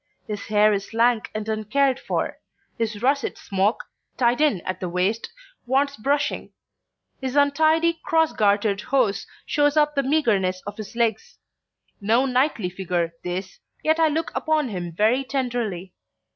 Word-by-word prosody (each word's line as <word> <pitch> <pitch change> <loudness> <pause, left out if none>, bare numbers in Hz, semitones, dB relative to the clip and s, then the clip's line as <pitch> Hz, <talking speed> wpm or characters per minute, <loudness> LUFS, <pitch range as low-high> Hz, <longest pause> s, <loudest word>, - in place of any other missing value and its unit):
His 205 -2 -6
hair 210 0 +4
is 200 +2 -4
lank 230 -1 +2
and 215 0 -3
uncared 255 +5 +1
for; - - -3 0.4
his 220 -2 -3
russet 275 +1 +1
smock, 200 +2 0 0.3
tied 245 +2 +2
in 290 - +2
at 185 - -4
the 180 - -3
waist, 185 +6 -1 0.4
wants 280 +2 +1
brushing; 280 +6 -1 0.7
his 260 0 -3
untidy 315 +3 +3
cross 320 -1 +2
gartered 205 -1 +2
hose 250 -6 0 0.2
shows 290 0 +2
up 300 0 +3
the 280 - +1
meagerness 220 -11 +1
of 205 0 -7
his 215 0 -8
legs. 240 - -1 0.6
No 230 +6 +3
knightly 250 -7 +1
figure 175 -2 -2
this, 185 +2 -5 0.2
yet 315 +1 +2
I 325 - +5
look 315 +2 -1
upon 310 -4 0
him 175 -4 -4
very 220 +10 +2
tenderly. 240 -9 -3
235 Hz, 145 wpm, -23 LUFS, 200-280 Hz, 0.7 s, I